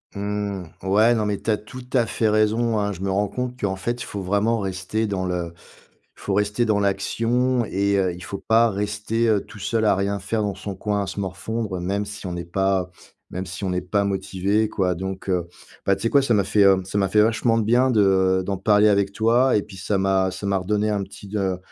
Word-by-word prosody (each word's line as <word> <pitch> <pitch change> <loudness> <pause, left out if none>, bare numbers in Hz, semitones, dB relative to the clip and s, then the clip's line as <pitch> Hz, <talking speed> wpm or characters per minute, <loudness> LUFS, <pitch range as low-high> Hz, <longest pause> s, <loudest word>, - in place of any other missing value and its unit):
Mmh. 100 -2 -3 0.2
Ouais, 110 +5 +4
non 110 -2 0
mais 105 -1 -1
tu - - -4
as 105 - +3
tout 125 +4 -11
à 120 -3 +3
fait 110 -1 0
raison, 110 +2 +2
hein. 105 0 0
Je 90 - -10
me 95 - -1
rends 100 +2 +1
compte 125 +4 -4
qu'en 95 -2 -1
fait 120 +6 -3
il - - -4
faut 100 - -5
vraiment 105 +5 +1
rester 95 +3 -2
dans 95 -2 -2
le 90 -2 -3 0.6
il - - -16
faut 100 - +1
rester 105 +3 +1
dans 110 -2 +2
l'action 115 +5 +1
et 100 0 0
heu, 95 -2 +1
il 90 +1 -10
faut 100 - -5
pas 115 +3 +3
rester, 105 +3 -1
heu, 105 -2 +3
tout - - -14
seul 110 +3 0
à 100 -2 +4
rien 100 +1 -1
faire 105 +3 -2
dans 100 - -1
son 100 0 -6
coin 105 +2 -1
à 95 - -6
se 100 - -5
morfondre 95 +1 -3
même 100 +3 -1
si 105 -1 -7
on 90 - -4
n'est 85 0 -5
pas 95 0 0 0.4
même 95 +1 -4
si 95 +3 -7
on 95 - -1
n'est 90 0 -1
pas 100 +3 0
motivé 100 +2 0
quoi 90 -3 0
donc 95 +1 -5
heu, 90 -2 0 0.4
bah, 100 - +4
tu 95 - -9
sais 115 - +2
quoi? 140 - +5
Ça 120 -3 +1
m'a 100 - +3
fait, 100 +2 +3
heu, 95 -1 +5
ça 100 +2 -3
m'a 95 -1 +1
fait 105 +1 +4
vachement 115 +1 +2
de 115 - +1
bien, 125 +4 +3
de 95 -3 +3
d'en 100 -1 -2
parler 105 +1 +4
avec 100 -1 +1
toi 120 +4 +3
et 105 - 0
puis 100 -2 -12
ça 100 +2 -1
m'a 95 -1 +2
ça 95 +2 -7
m'a 100 -1 +2
redonné 105 +3 0
un 100 - 0
petit 100 +1 -11
de 95 -3 -1
100 Hz, 245 wpm, -23 LUFS, 95-110 Hz, 0.6 s, quoi